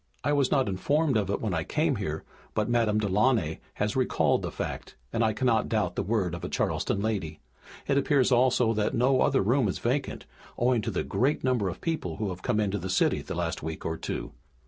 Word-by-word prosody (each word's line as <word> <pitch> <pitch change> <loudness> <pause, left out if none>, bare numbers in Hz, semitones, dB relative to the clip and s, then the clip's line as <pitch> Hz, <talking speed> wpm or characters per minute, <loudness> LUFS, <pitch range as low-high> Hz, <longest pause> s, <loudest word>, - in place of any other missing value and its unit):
I - - +1
was 140 -3 +2
not 135 -2 +2
informed 140 +9 +1
of 105 -3 +1
it 100 - -1
when 105 -5 -1
I 80 -1 0
came - - 0
here, - - -3 0.3
but 105 -1 +1
Madame 115 -3 +2
Delaunay 105 -4 +1 0.2
has 105 0 -1
recalled 130 -1 +2
the - - -3
fact - - -5 0.2
and 115 - +1
I 110 - +3
cannot 115 0 +1
doubt 105 -6 0
the - - 0
word 100 -3 0
of 85 - -6
a - - -3
Charleston 100 - -1
lady. 95 -9 -2 0.5
It 140 0 +3
appears 140 -2 +2
also 125 -2 +3
that 110 -1 0
no 130 +2 +3
other 140 -7 +3
room 120 +3 +2
is 95 - -2
vacant, 130 +3 -2 0.3
owing 120 -1 +2
to - - -3
the - - -1
great 140 +5 0
number 125 -7 +1
of 85 - -7
people 155 - -2
who 105 -1 -2
have 90 0 -6
come 115 -1 0
into 105 -1 0
the 95 - -5
city 95 - +2
in - - -10
the - - -4
last - - -2
week 80 +1 -6
or 80 - -1
two. - - -5
110 Hz, 225 wpm, -28 LUFS, 95-130 Hz, 0.5 s, I